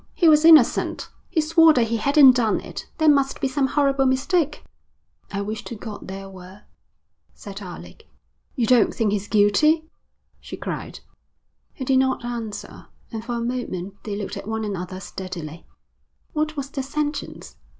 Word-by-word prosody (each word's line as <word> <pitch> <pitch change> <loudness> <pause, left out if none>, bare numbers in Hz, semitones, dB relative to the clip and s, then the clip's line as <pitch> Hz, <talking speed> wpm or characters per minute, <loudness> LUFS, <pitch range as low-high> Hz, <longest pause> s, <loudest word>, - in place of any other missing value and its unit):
He 345 - +3
was 305 -1 +6
innocent. 325 -1 +4 0.2
He 320 - +1
swore 325 +1 +5
that 235 -5 +1
he 230 - 0
hadn't 280 +3 +6
done 235 -4 +1
it. - - -9
There 315 - +2
must 275 -2 +3
be 275 - 0
some 265 +1 0
horrible 275 -1 +2
mistake.' 290 +4 0 0.7
'I 200 - -3
wish 215 +1 -5
to 235 - -6
God 215 -1 -9
there 195 +1 -7
were,' 190 +1 -13 0.7
said 200 0 -9
Alec. 180 -3 -11 0.5
'You 245 -5 +1
don't 240 -1 +3
think 220 -3 +1
he's 205 0 -2
guilty?' 305 +11 +3 0.5
she - - -9
cried. - - -6 0.7
He 260 - -5
did 260 0 +3
not 260 -2 0
answer, 230 -3 -6 0.2
and 220 -2 -5
for 240 +1 -4
a 235 - -3
moment 205 -6 -5
they 210 -2 -4
looked 205 -1 -5
at - - -8
one 220 0 -3
another 185 -2 -5
steadily. 175 -4 -8 0.7
'What 310 0 -2
was 275 0 -5
the 275 - -3
sentence?' 295 +2 -5
240 Hz, 165 wpm, -23 LUFS, 205-285 Hz, 0.7 s, was